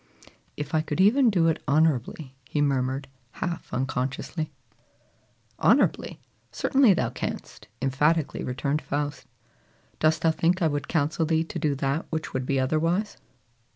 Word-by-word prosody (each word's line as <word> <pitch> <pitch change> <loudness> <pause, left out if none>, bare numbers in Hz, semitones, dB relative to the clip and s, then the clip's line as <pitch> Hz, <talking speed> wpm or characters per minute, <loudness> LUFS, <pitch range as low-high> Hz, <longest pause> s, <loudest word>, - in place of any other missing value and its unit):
"If 150 0 -5
I 155 - +3
could 155 +1 -4
even 235 +7 +5
do 175 -6 +3
it 160 - 0
honorably," 145 -2 +1
he 150 - -1
murmured 135 -1 0 0.3
half 175 -1 -4
unconsciously. 130 +5 -3 1.1
"Honorably! - - +2 0.3
certainly 265 -8 +4
thou - - -1
canst," - - -6 0.2
emphatically 150 +4 +1
returned 140 +4 -1
Faust. 145 0 -3 0.7
"Dost 155 +1 +2
thou 165 - +5
think 170 +3 +1
I - - +5
would 145 -1 -2
counsel 160 0 0
thee 160 0 +2
to 165 - -6
do 150 -3 0
that 140 +3 -1
which 160 -1 -4
would 130 -1 -2
be 135 -1 +1
otherwise? 165 +9 0
155 Hz, 140 wpm, -26 LUFS, 135-165 Hz, 1.1 s, even